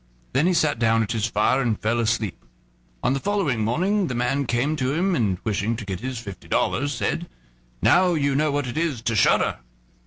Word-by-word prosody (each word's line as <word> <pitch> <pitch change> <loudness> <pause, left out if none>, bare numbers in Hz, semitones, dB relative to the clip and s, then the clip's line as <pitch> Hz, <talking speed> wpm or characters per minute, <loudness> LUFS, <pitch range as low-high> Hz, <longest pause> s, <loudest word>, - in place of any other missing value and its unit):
Then 140 +7 +3
he 185 - +3
sat 150 -7 +1
down 115 -1 +3
at 110 - -4
his 115 -2 0
fire 115 +5 +2
and 115 -4 0
fell 115 +2 0
asleep. 110 - -1 0.6
On 130 - +2
the 135 - -1
following 165 - 0
morning 185 - +1
the 125 - -3
man 125 +3 0
came 125 +7 0
to 130 -1 0
him, 185 +3 +1
and, 100 -7 +1
wishing 110 +1 -1
to 110 -2 -7
get 95 -2 -4
his 130 +2 -4
fifty 100 -4 -9
dollars, 145 +2 0
said: 120 - -2 0.5
"Now 180 -1 +4
you 140 -2 +1
know 150 +3 +2
what 145 -1 -1
it 125 +4 -3
is 150 -9 -1
to 115 -1 0
shudder." 100 - +3
125 Hz, 210 wpm, -23 LUFS, 115-150 Hz, 0.6 s, Now